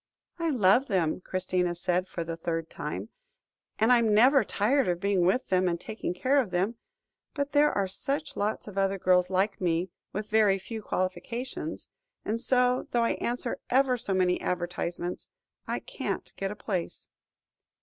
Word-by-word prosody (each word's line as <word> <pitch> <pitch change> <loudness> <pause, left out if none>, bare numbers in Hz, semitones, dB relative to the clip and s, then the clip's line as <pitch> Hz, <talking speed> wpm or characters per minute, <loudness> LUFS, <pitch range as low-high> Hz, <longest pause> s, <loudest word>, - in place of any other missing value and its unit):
"I 335 -1 0
love 245 0 +4
them," 185 -5 0
Christina 180 -1 -1
said, 180 +1 0
for 170 - -4
the 165 0 -4
third 165 0 -3
time, - - -5 0.7
"and 225 +3 +5
I 245 - +6
am 220 -2 +3
never 255 +4 +6
tired 240 +7 +1
of 175 -1 0
being 190 -2 +2
with 250 +8 +1
them, 185 0 +3
and 170 -1 0
taking 215 0 -4
care 255 +10 +2
of 230 - -5
them. 190 +6 0 0.6
But 285 -1 -2
there 295 +1 +4
are 200 -1 0
such 285 +10 -3
lots 210 +2 -2
of 200 -1 -4
other 195 0 +1
girls 180 -1 +3
like 195 +2 0
me, 175 0 0 0.2
with 210 +2 -4
very 210 -3 +4
few 220 +3 -7
qualifications, 230 +7 -3 0.4
and 225 +2 -1
so, 250 0 +2
though 240 -1 +2
I 230 - +2
answer 240 0 -2
ever 260 0 +3
so 225 -5 -1
many 180 -1 +2
advertisements, 175 0 -3 0.4
I - - -1
can't - - -5
get 195 - -2
a 210 - -5
place." 190 -5 -4
200 Hz, 170 wpm, -28 LUFS, 180-245 Hz, 0.7 s, I